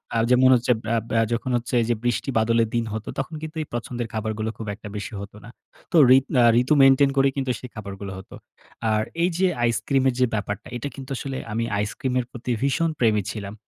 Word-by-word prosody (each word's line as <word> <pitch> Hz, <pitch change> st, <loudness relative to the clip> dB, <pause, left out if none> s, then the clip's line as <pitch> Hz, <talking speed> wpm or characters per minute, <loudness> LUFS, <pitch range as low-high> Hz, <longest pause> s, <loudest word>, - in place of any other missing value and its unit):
আ -, -, +2 dB
যেমন 130 Hz, +1 st, +6 dB
হচ্ছে 125 Hz, 0 st, +1 dB
বা 110 Hz, -, -1 dB, 0.2 s
বআ 115 Hz, 0 st, +2 dB
যখন 120 Hz, +2 st, -2 dB
হচ্ছে 120 Hz, +1 st, -6 dB
এই 115 Hz, -, 0 dB
যে 120 Hz, -, +2 dB
বৃষ্টি 120 Hz, +2 st, -1 dB
বাদলের 115 Hz, 0 st, +3 dB
দিন 115 Hz, -1 st, +1 dB
হতো, 110 Hz, 0 st, -5 dB
তখন 135 Hz, +4 st, -4 dB
কিন্তু 155 Hz, +1 st, -7 dB
এই 155 Hz, -, -5 dB
পছন্দের 120 Hz, 0 st, -4 dB
খাবারগুলো 110 Hz, 0 st, -2 dB
খুব 110 Hz, -, -7 dB
একটা 105 Hz, -, -11 dB
বেশি 105 Hz, +2 st, -5 dB
হত 100 Hz, +1 st, -8 dB
না। 115 Hz, -, -11 dB, 0.4 s
তো 175 Hz, -, +3 dB, 0.2 s
ঋত 135 Hz, 0 st, +3 dB, 0.2 s
আ -, -, +6 dB, 0.2 s
ঋতু 130 Hz, +4 st, +2 dB
মেইনটেইন 135 Hz, +1 st, +6 dB
করে 135 Hz, -, +5 dB
কিন্তু 130 Hz, -2 st, -1 dB
সেই 125 Hz, -, -9 dB
খাবারগুলো 100 Hz, -2 st, -7 dB
হতো। 95 Hz, -, -11 dB, 0.6 s
আর 110 Hz, 0 st, +2 dB, 0.2 s
এই 175 Hz, -, +3 dB
যে 190 Hz, +1 st, +3 dB, 0.2 s
আইসক্রিমের 130 Hz, +3 st, +1 dB
যে 130 Hz, -, +5 dB
ব্যাপারটা, 105 Hz, -1 st, -3 dB
এটা 120 Hz, -, -4 dB
কিন্তু 135 Hz, -1 st, -9 dB
আসলে 135 Hz, -1 st, -4 dB
আমি 115 Hz, +2 st, -1 dB
আইসক্রিমের 125 Hz, +5 st, -1 dB
প্রতি 125 Hz, 0 st, -5 dB
ভীষণ 150 Hz, +5 st, +1 dB
প্রেমী 110 Hz, -3 st, +3 dB
ছিলাম, 100 Hz, -2 st, -6 dB
120 Hz, 210 wpm, -24 LUFS, 110-130 Hz, 0.6 s, যেমন